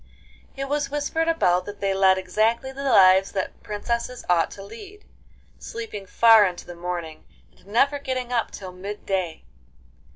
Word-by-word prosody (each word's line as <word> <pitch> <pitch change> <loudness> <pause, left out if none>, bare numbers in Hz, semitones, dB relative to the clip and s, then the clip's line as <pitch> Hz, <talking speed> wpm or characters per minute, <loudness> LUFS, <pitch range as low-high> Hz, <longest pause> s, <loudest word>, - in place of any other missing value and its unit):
It 275 0 -3
was 290 0 -1
whispered 295 +3 -1
about 180 - +2
that 205 0 -8
they 195 -1 0
led 190 -1 +4
exactly 220 +7 0
the 275 +1 -7
lives 190 -6 +5
that 190 - -4
princesses 235 +3 -4
ought 175 -2 +2
to 195 - -10
lead, 410 - -12 0.5
sleeping 215 -4 -7
far 225 +1 +6
into 180 -3 -2
the 175 - -9
morning, 170 -2 -6 0.3
and - - -24
never 275 +7 +2
getting 255 -3 -3
up 230 -2 0
till 190 -2 -9
mid 195 +3 -8
day. 185 -5 -2
210 Hz, 160 wpm, -24 LUFS, 185-265 Hz, 0.5 s, far